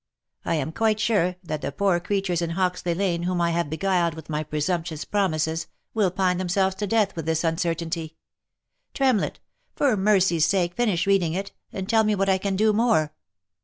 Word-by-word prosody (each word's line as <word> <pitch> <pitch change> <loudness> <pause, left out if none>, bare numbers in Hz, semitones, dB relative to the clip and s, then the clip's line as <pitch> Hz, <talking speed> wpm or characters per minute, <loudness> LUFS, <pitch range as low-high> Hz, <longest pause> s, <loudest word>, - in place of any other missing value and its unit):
I 165 - 0
am 155 0 -2
quite 220 +3 +1
sure, 200 -5 +1
that 155 -3 -4
the - - -3
poor 185 +3 +1
creatures 180 -1 -1
in 170 - -1
Hoxley 180 -2 0
lane, 175 -2 0
whom 180 0 -1
I 170 0 +2
have 170 -3 -1
beguiled 170 0 0
with 160 0 -9
my 150 0 -1
presumptious 160 +1 -2
promises, 160 -5 0 0.3
will 210 -4 +2
pine 185 0 0
themselves 190 +1 +1
to 205 - -2
death 210 -1 +1
with 165 -2 -5
this 160 +1 0
uncertainty. 165 -1 -2 0.8
Tremlett! 260 -7 +1 0.4
for 275 -6 +2
mercy's 190 -5 +3
sake 175 -3 +1
finish 205 -7 +1
reading 190 -5 +2
it, 200 +1 -4 0.2
and 190 -1 -5
tell 220 +1 +4
me 215 -1 +2
what 195 0 0
I 190 0 +3
can 195 0 -1
do 215 +2 +3
more 210 -9 +2
180 Hz, 185 wpm, -24 LUFS, 165-200 Hz, 0.8 s, tell